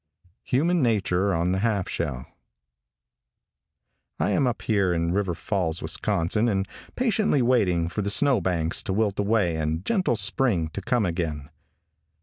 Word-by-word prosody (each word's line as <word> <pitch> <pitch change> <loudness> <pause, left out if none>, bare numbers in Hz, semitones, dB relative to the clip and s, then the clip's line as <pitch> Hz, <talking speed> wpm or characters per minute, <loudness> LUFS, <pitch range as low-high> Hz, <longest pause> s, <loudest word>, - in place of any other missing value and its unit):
HUMAN' 165 +6 +1
NATURE 100 -5 +1
ON 85 0 0
THE 95 - 0
HALF 100 -3 0
SHELL. 70 -7 -4 1.9
|I - - +1
AM 135 - +2
up 120 - -3
here 100 -5 +1
in 85 0 0
River 95 -3 -1
Falls, 90 -4 -2
Wisconsin, 95 +5 0
and 95 -3 0 0.3
patiently 215 - +1
waiting 95 -9 +2
for 95 +5 -3
the 100 - -1
snow 130 +1 +4
banks 85 -1 -1
to 105 -3 -3
wilt 105 -1 0
away 100 -5 +1
and 80 +2 -2
gentle 185 - +1
spring 105 -5 +1
to 100 - -6
come 115 +2 0
again. 80 -5 -3
100 Hz, 145 wpm, -25 LUFS, 85-115 Hz, 1.9 s, snow